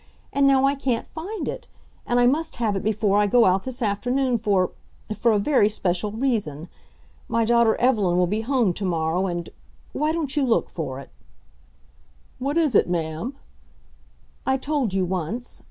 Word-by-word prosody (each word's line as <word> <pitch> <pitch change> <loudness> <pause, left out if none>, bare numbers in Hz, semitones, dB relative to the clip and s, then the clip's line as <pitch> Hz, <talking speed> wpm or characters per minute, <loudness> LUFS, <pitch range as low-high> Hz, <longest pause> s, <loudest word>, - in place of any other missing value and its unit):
And 280 0 +4
now 270 -1 +4
I 275 - +3
can't 265 -4 -2
find 370 +8 -5
it, - - -5 0.4
and 240 0 +2
I 245 - +5
must 310 +6 +1
have 220 -4 0
it 195 - -1
before 210 -1 +1
I 210 - +3
go 235 +3 +5
out 185 +1 +2
this 260 -1 -4
afternoon 245 +4 0
for 200 -4 +1 0.4
for 230 +3 +2
a 215 - +3
very 210 -1 +3
special 195 -1 -1
reason. 210 - -2 0.6
My 230 0 +1
daughter 235 -1 +4
Evelyn 210 -8 +2
will 180 - +4
be 210 +5 -1
home 235 -5 +1
to 200 - -6
morrow 170 +1 0
and 175 -2 -4 0.4
why 305 +1 0
don't 315 -3 -2
you 290 - +2
look 240 -3 +1
for 135 -6 -5
it?" 140 - -12 1.3
"What 280 +4 -1
is 310 -6 +2
it, 200 - +4
ma'am?" 165 - -3 1.1
"I 265 0 +1
told 280 -5 -1
you 190 -1 0
once. 190 +7 -4
225 Hz, 175 wpm, -24 LUFS, 190-265 Hz, 1.3 s, I